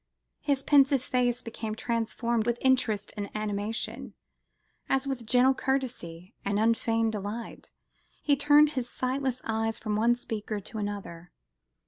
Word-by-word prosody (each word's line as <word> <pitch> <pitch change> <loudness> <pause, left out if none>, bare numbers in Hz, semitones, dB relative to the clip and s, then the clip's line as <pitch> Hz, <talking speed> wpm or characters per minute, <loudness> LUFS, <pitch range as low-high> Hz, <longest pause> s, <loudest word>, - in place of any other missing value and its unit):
His 275 -2 0
pensive 275 -2 +5
face 250 -1 0
became 220 -1 -5
transformed 230 0 -1
with 240 0 +1
interest 235 -6 +1
and 205 -2 -4
animation, 215 +1 -3 0.7
as 270 0 +1
with 260 -5 -4
gentle 250 +3 +5
courtesy 240 -11 -3
and 200 0 0
unfeigned 225 0 +2
delight 210 +2 -6 0.5
he 290 - +2
turned 290 +1 +5
his 255 -4 -3
sightless 260 0 -2
eyes 225 0 -1
from 215 -2 -2
one 230 +3 +3
speaker 215 -3 -4
to 215 +3 -7
another. 195 -5 -5
230 Hz, 130 wpm, -28 LUFS, 215-260 Hz, 0.7 s, pensive